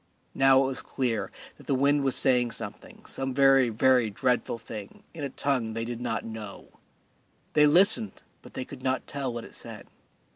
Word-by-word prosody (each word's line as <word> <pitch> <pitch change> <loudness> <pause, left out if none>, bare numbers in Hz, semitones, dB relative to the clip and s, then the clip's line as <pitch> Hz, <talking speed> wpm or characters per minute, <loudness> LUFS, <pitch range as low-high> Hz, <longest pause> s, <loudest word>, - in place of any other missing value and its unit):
Now 135 0 +5
it - - 0
was 130 -1 -2
clear 120 -5 -2 0.3
that - - -17
the 135 - +1
wind 140 +2 +2
was 135 -1 +1
saying 125 -3 +3
something, - - -8
some 135 -1 -3
very, 135 -2 +5
very 125 +1 +3
dreadful 120 +3 -1
thing 110 -3 -10
in 160 -3 -7
a 140 - -2
tongue 130 -5 -1
that 115 - -3
they - - -3
did 120 0 -5
not 115 -2 -3
know. 110 -3 -8 0.8
They 150 -1 +5
listened, 195 +7 +4 0.2
but - - -16
they 130 - -4
could 135 -2 -11
not 130 -1 -1
tell 140 -3 -4
what 120 -1 -6
it - - -14
said. - - -9
130 Hz, 190 wpm, -27 LUFS, 115-135 Hz, 0.8 s, Now